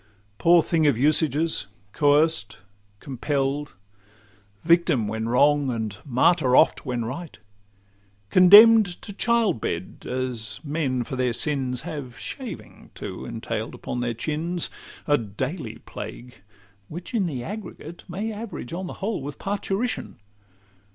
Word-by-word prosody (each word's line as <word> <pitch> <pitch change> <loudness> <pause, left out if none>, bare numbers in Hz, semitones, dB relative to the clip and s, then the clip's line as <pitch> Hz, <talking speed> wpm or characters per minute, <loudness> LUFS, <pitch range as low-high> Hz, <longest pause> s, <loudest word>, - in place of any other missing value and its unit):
Poor 170 -1 +5
thing 160 -2 +2
of 140 -6 +3
usages! 155 0 +1 0.2
coerced, 145 -6 +2 0.4
compell'd, 140 +2 -2 0.9
Victim 165 -9 +3
when 110 +1 -3
wrong, 145 +3 +3
and 110 -4 -3
martyr 130 +1 +3
oft 160 - +4
when 120 -2 -2
right, 150 +7 -6 0.9
Condemn'd 205 +1 +8
to 205 - -7
child 230 - +1
bed, 85 +2 -4
as 120 -4 -3
men 140 -5 -1
for 130 - -6
their 125 -2 0
sins 130 -2 -1
Have 145 -7 -7
shaving 255 - -8
too - - -7
entail'd - - -4
upon 125 - -5
their 120 -1 -2
chins,— 160 +7 -2 0.3
A 145 -1 +3
daily 115 - -5
plague, 120 -4 -9 0.5
which 175 - -8
in 205 -6 +1
the 130 -7 -4
aggregate 180 - -8
May 210 +5 -3
average 205 - -7
on 185 +2 -4
the - - -6
whole 215 -7 -2
with 145 +1 -7
parturition. 205 - -3
145 Hz, 125 wpm, -24 LUFS, 125-175 Hz, 0.9 s, Condemn'd